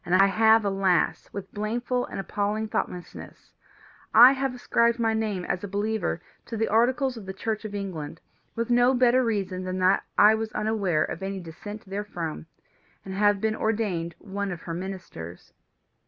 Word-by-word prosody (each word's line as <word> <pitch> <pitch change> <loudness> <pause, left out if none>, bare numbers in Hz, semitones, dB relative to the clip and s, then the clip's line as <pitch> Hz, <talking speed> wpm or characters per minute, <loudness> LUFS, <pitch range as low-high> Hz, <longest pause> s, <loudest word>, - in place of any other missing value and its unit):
I 185 +2 +4
have, 220 +2 +4
alas, 195 -3 +1
with 195 -1 -8
blameful 240 +4 -2
and - - -6
appalling 210 +2 -2
thoughtlessness 180 -4 -5 0.6
I 245 +4 +10
subscribed 250 -3 +1
my 225 -2 +1
name, 210 -5 -2
as 180 - -2
a - - -3
believer, 205 0 -2 0.2
to 230 - -5
the 225 - +1
Articles 250 +3 +2
of 205 -4 -9
the 190 - -4
Church 220 +2 -3
of 205 -1 -5
England, 165 -6 -5 0.4
with 230 +1 -2
no 245 +2 +4
better 250 +1 +4
reason 195 -5 -2
than 185 0 -3
that 185 +1 +3
I 210 +1 +7
was 220 0 -2
unaware 205 -7 +1
of - - -5
any 195 0 -3
dissent 195 +5 -9
therefrom, 190 -6 -5 0.6
and 190 - -6
have 205 0 +3
been 220 +1 0
ordained 200 -8 -1
one 200 +1 -4
of 170 -2 -6
her 165 - -5
ministers. 175 - -8
205 Hz, 165 wpm, -26 LUFS, 185-225 Hz, 0.6 s, I